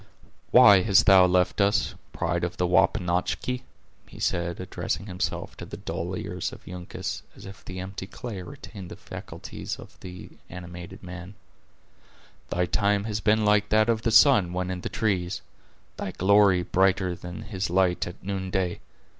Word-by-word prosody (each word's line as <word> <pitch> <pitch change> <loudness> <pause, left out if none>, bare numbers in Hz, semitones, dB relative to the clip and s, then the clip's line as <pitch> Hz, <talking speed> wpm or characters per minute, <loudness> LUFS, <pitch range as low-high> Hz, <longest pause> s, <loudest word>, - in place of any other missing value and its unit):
"Why 105 -6 +8
hast 100 0 +4
thou 95 -2 +7
left 90 +2 +2
us, 100 +4 +2 0.2
pride 85 +1 -1
of 90 - -3
the 90 - +1
Wapanachki?" 90 +7 +1 0.5
he - - -13
said, 85 0 -1
addressing 90 +2 -3
himself 90 -3 -3
to - - -7
the - - -8
dull - - -4
ears - - -4
of - - -13
Uncas, 90 -1 -5
as - - -12
if 95 +1 -11
the 90 0 -7
empty 95 +1 -6
clay 110 -4 -7
retained 100 -5 -10
the - - -8
faculties - - -7
of - - -14
the 90 -1 -10 0.2
animated 90 +1 -9
man; 90 +2 -9 1.1
"thy 90 +1 +1
time 100 +2 +1
has 105 -1 -2
been 110 0 +2
like 105 0 +3
that 110 +1 +3
of 110 -1 +2
the 115 - +1
sun 110 -7 +6
when 90 0 -2
in 90 -1 -4
the - - -4
trees; 95 -4 -1 0.5
thy - - -3
glory 100 -1 +4
brighter 95 0 +2
than 90 +4 -8
his 100 -3 -3
light 90 0 +2
at 90 - -10
noonday. 95 -2 -2
95 Hz, 165 wpm, -26 LUFS, 90-105 Hz, 1.1 s, Why